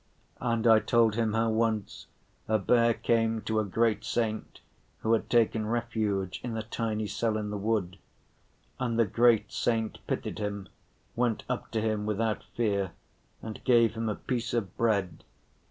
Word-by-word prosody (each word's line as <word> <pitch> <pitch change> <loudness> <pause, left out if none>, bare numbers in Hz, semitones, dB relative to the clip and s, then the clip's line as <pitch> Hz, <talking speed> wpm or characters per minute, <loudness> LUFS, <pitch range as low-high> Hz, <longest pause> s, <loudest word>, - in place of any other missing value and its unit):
And 115 -2 0
I 110 -1 +7
told 115 -1 +3
him 110 -1 0
how 115 0 +2
once 110 -2 -1 0.4
a 110 - +3
bear 115 +3 +3
came 115 0 +1
to 110 0 0
a - - +1
great 110 +2 +1
saint 110 -2 -2 0.4
who 110 - +2
had 115 - 0
taken 110 -2 +2
refuge 110 -5 -1
in 115 -2 -3
a 110 - -3
tiny 110 -1 -2
cell 110 +1 -1
in 105 -1 -3
the 105 - -3
wood. 100 -3 -1 0.8
And 120 -3 -1
the 115 - +4
great 110 0 +3
saint 110 -2 -1
pitied - - -3
him, 100 -2 -4 0.5
went 120 -2 0
up 125 -1 -3
to 110 - +1
him 110 -1 -1
without 110 +1 -1
fear 100 -5 0 0.5
and 110 -1 -7
gave 115 -3 +4
him 115 -1 -2
a 105 - -1
piece 120 -2 -3
of 100 -6 -2
bread. 100 -6 0
110 Hz, 165 wpm, -29 LUFS, 105-115 Hz, 0.8 s, I